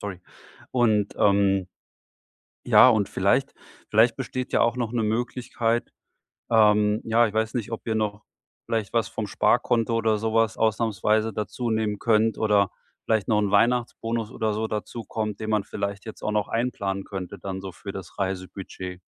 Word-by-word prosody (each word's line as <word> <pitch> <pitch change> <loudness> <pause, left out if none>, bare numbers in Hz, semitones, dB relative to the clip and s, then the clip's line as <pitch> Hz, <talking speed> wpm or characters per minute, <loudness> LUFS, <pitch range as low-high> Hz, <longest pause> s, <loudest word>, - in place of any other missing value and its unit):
Sorry. 95 -3 -6 0.5
Und, 110 -5 +2
ähm 100 -2 +3 1.0
Ja, - - +7
und 110 -5 +2
vielleicht - - +1 0.4
vielleicht 115 +2 +4
besteht 130 -1 -4
ja - - +4
auch 115 0 +2
noch 120 -3 -2
'ne 120 -2 0
Möglichkeit 120 +1 -1 0.6
ähm, 105 -1 +4
ja, 115 +1 +3
ich 105 - -7
weiß 110 0 0
nicht, 115 -3 -3
ob 115 - -6
ihr 110 - +1
noch 105 -1 -2 0.4
vielleicht 110 -3 -2
was 115 -4 +1
vom 110 - -4
Sparkonto 115 +2 +1
oder 110 -1 +2
sowas 110 +1 +1
ausnahmsweise 110 0 +1
dazu 115 +4 -3
nehmen 110 -2 -1
könnt 110 -1 +2
oder 105 -2 +3 0.3
vielleicht 110 -4 +1
noch 105 -2 +3
'n 105 -2 0
Weihnachtsbonus 115 0 +1
oder 110 -3 -1
so 110 +1 -2
dazukommt, 110 -1 -4
den 110 - -3
man 105 -2 +2
vielleicht 100 -1 -4
jetzt 110 - -9
auch 105 - -1
noch 105 -1 0
einplanen 100 -5 -2
könnte, 95 0 -6
dann 95 +1 -5
so 95 - -7
für 85 +6 -8
das 95 -2 -9
Reisebudget? 95 -1 -5
110 Hz, 165 wpm, -25 LUFS, 100-115 Hz, 1.0 s, Ja